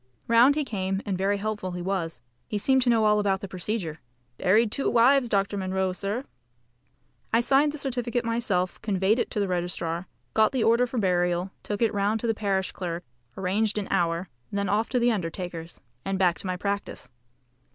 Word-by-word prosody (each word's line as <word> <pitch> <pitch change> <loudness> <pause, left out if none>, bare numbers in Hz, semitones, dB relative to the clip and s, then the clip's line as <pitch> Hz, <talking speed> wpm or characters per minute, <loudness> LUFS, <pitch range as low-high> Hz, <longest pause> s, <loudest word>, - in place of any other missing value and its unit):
Round 235 +5 +6
he 300 -1 0
came, 195 -3 -2
and 200 -3 -1
very 195 +2 +1
helpful 205 -3 -3
he 180 - -4
was. 170 -8 -2 0.3
He 210 - -2
seemed 265 +6 +3
to 245 - +2
know 225 -2 +4
all 210 0 +4
about 195 -2 +1
the 195 - -5
procedure 185 -3 -3 0.4
"Buried 210 +4 +3
two 275 - 0
wives, 245 +2 +4
Dr. 200 0 +1
Munro, 190 -1 -1
sir!" 205 +8 -3 1.1
I 230 - +4
signed 275 +5 +3
the 305 - -7
certificate 245 -3 -2
myself, 225 -6 0
conveyed 205 +2 +1
it - - 0
to 215 - -3
the 200 - +1
registrar, 175 -1 -2 0.3
got 220 +2 +3
the 255 -4 +1
order 235 +2 +4
for 245 - -5
burial, 180 -2 +1
took 205 +2 -2
it 225 -1 +2
round 205 +2 +1
to - - -3
the 225 - +2
parish 195 -3 -1
clerk, 175 -1 -4 0.3
arranged 205 +3 0
an 205 - -2
hour, 170 +1 +1 0.2
then 200 -1 -1
off 215 +3 +1
to 255 - 0
the 240 0 +3
undertaker's, 170 -3 -5 0.2
and 195 0 -1
back 175 -4 +2
to 190 - -4
my 185 0 -2
practice. 200 -4 -4
200 Hz, 195 wpm, -26 LUFS, 185-230 Hz, 1.1 s, Round